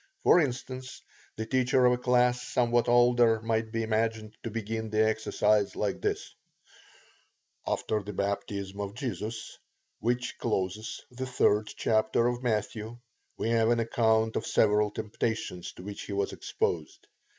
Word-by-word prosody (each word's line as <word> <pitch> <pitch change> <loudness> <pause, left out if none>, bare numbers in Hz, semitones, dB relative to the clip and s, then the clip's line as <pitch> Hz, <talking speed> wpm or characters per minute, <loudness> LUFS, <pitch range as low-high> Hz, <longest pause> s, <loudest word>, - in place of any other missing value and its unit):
For - - +6
instance, 130 -3 -3 0.4
the 110 - -4
teacher 130 +1 +3
of 125 - +6
a - - +1
class 125 0 +3
somewhat 120 -1 +1
older 120 -2 +5
might 110 0 -1
be 115 0 -1
imagined 110 -1 -1
to 115 - -4
begin 110 0 -3
the 110 0 +3
exercise 105 -1 +1
thus: - - -1
T. - - -2 1.3
After 105 -1 0
the 100 +1 -7
baptism 100 0 -3
of 100 +1 -5
Jesus, 115 -3 -5 0.4
which 120 +2 -1
closes 105 -1 -2
the 130 +1 -5
3d 105 -4 +1
chapter 110 +1 +2
of 120 0 -1
Matthew, 110 -1 -2 0.4
we - - -1
have 115 -1 +3
an 120 0 +3
account 110 -1 +2
of 110 - -2
several 105 0 +3
temptations 105 -4 -3
to - - -11
which 100 +1 -7
he 100 - -6
was 100 0 -1
exposed. 80 -3 -3
110 Hz, 145 wpm, -29 LUFS, 105-120 Hz, 1.3 s, For